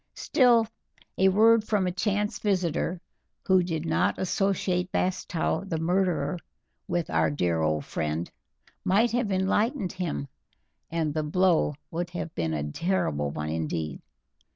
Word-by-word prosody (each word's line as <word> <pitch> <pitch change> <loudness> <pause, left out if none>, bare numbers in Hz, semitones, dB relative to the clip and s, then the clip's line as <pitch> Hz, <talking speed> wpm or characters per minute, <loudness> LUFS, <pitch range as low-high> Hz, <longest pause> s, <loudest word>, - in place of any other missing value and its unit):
Still, 240 -4 +4 0.5
a 190 0 +6
word 220 +3 +5
from 210 -3 +1
a 180 - 0
chance 205 +3 -1
visitor, 180 -3 0 0.5
who 185 -1 +5
did 165 -2 -3
not 160 - +1
associate 185 -1 0
Bastow 185 -1 -1
the 180 -5 -3
murderer 180 +1 0 0.5
with 175 -2 -1
our 80 0 +3
dear 80 +2 0
old 80 -2 0
friend, 80 +2 -2 0.6
might 220 +6 +3
have 240 -3 0
enlightened 195 +4 +1
him, 175 -6 -3 0.6
and 160 -3 -1
the 155 - 0
blow 165 -1 +2 0.2
would 175 +1 -3
have 175 -2 -5
been 80 -2 -1
a 75 - -2
terrible 75 - 0
one 75 +2 -4
indeed. 80 -1 -3
180 Hz, 135 wpm, -27 LUFS, 145-195 Hz, 0.6 s, a